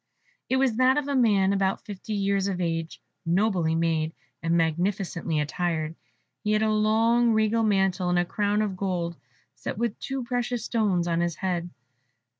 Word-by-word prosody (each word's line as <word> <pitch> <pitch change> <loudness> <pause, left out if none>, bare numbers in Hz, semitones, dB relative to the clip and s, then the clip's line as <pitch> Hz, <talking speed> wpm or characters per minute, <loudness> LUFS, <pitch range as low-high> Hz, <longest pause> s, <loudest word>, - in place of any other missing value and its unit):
It 260 - +2
was 260 -4 +2
that 255 +2 +4
of 295 -1 -1
a 285 - -1
man 200 -6 +3
about 195 -1 0
fifty 205 +1 -6
years 200 -1 +1
of 190 -2 -2
age, 165 -2 -2 0.2
nobly 175 -2 +1
made, 165 -1 0 0.3
and 165 +1 +1
magnificently 170 0 0
attired; 160 +1 -2 0.5
he 210 - +1
had 215 +1 +2
a 215 - +2
long 225 +2 +3
regal 220 +1 +2
mantle, 195 -4 +1
and 180 - +2
a 175 - +2
crown 205 +3 0
of 200 -3 -2
gold, 180 -3 -2 0.4
set - - -6
with 235 -1 -1 0.3
precious 245 -1 -2
stones, 200 -7 +1
on 170 -1 +1
his 175 -2 -1
head. 175 -1 -2
195 Hz, 165 wpm, -26 LUFS, 170-220 Hz, 0.5 s, that